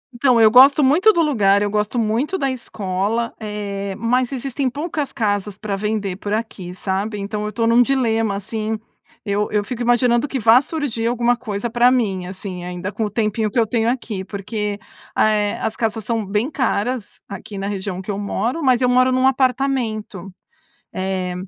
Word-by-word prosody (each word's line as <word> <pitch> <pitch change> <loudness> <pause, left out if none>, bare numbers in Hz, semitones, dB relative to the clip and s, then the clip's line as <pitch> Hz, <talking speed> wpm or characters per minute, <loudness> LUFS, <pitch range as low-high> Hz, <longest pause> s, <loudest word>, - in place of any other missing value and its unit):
Então 245 -1 +3
eu 220 -1 +6
gosto 275 +5 +7
muito 330 +11 +5
do 340 - +1
lugar. 205 -10 +3
Eu 205 - 0
gosto 210 +3 -1
muito 235 - 0
da 275 -2 0
escola, 215 -1 -2
eh, 200 -2 -4
mas 250 +2 +1
existem 270 +1 -2
poucas 295 +1 -3
casas 205 -4 -1
para 205 -2 -3
vender 205 -2 -2
por 205 0 -4
aqui, 210 -5 -4
sabe? 195 +3 -2
Então 210 +1 -4
eu 210 - -2
estou 230 +1 -1
num 235 +1 +5
dilema 225 -5 +1
assim. 215 +2 -3 0.5
Eu 205 0 0
eu 210 -1 +1
fico 240 +3 -5
imaginando 240 +1 +2
que 270 -1 -3
vá 230 +3 +6
surgir 280 -7 -2
alguma 240 0 +2
coisa 220 -1 -4
para 240 +2 +4
mim, 200 -8 0
assim, 185 -1 -6
ainda 180 +2 -5
com 215 +2 -2
o - - -2
tempinho 215 0 0
que 235 - 0
eu 225 - +4
tenho 225 +1 0
aqui, 230 -6 -3
porque 205 +1 -4 0.4
a 215 - +4
é 210 -1 0
as 220 0 -2
casas 225 -1 -2
são 225 0 -1
bem 210 +8 -1
caras 250 -4 -2
aqui 200 +1 -8
na 195 +1 -3
região 190 -2 -4
que 195 +2 -5
eu 200 - -4
moro, 235 +9 -2
mas 255 -3 +3
eu 250 - +3
moro 255 +1 +4
num 255 +1 +2
apartamento, 250 -7 -1 0.6
é 185 -1 -2
220 Hz, 185 wpm, -20 LUFS, 200-250 Hz, 0.6 s, gosto